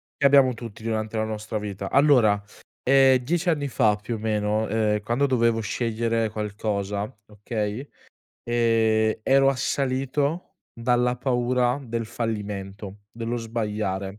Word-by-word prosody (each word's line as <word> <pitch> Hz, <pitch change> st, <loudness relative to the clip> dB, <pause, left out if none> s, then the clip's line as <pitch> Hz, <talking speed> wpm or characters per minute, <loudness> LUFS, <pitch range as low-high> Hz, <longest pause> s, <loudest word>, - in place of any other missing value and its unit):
che -, -, -6 dB
abbiamo 135 Hz, -2 st, +5 dB
tutti 115 Hz, -2 st, -9 dB
durante 110 Hz, -1 st, -2 dB
la 110 Hz, -, +1 dB
nostra 110 Hz, 0 st, -4 dB
vita. 100 Hz, -2 st, -5 dB
Allora, 125 Hz, -8 st, +4 dB, 0.4 s
ehm, 135 Hz, 0 st, +5 dB
10 170 Hz, +8 st, -1 dB
anni 145 Hz, -3 st, 0 dB
fa 110 Hz, -4 st, +2 dB
più 105 Hz, +3 st, -5 dB
o -, -, -5 dB
meno, 105 Hz, 0 st, 0 dB
uhm, 110 Hz, -1 st, +1 dB
quando 120 Hz, +6 st, 0 dB
dovevo 115 Hz, -4 st, +2 dB
scegliere 115 Hz, 0 st, -1 dB
qualcosa, 105 Hz, -1 st, -3 dB
okay, 105 Hz, +4 st, -4 dB, 0.5 s
ehm, 115 Hz, -2 st, +2 dB
ero 135 Hz, +3 st, +4 dB
assalito 140 Hz, +6 st, -1 dB, 0.2 s
dalla 125 Hz, +1 st, +1 dB
paura 125 Hz, +1 st, +1 dB
del 115 Hz, -2 st, -3 dB
fallimento, 105 Hz, -3 st, -5 dB
dello 115 Hz, +1 st, -3 dB
sbagliare 105 Hz, -4 st, -3 dB
115 Hz, 125 wpm, -24 LUFS, 105-125 Hz, 0.5 s, abbiamo